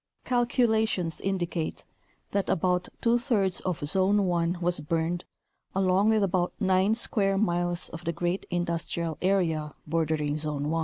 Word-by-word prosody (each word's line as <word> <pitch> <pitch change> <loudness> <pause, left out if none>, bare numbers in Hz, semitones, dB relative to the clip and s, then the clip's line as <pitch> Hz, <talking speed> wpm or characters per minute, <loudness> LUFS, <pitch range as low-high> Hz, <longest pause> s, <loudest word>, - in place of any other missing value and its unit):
Calculations 220 -8 +1
in 195 0 -1
dicate 170 -2 -3 0.5
that 200 -2 0
about 180 0 +1
two 235 +1 +3
thirds 210 -7 +1
of 170 -5 -2
Zone 195 +5 +3
1 175 -1 0
was 175 -1 +1
burned 165 +3 -1 0.5
along 195 +2 +3
with 220 -2 +3
about 180 -2 0
nine 190 +1 +3
square 195 -4 0
miles 175 -3 0
of 165 +1 -9
the 170 - -1
great 175 +3 -2
industrial 170 -2 -2
area 165 -6 +1
bordering 155 -2 0
Zone 150 -1 -2
1. 165 - +1
175 Hz, 145 wpm, -27 LUFS, 165-195 Hz, 0.5 s, two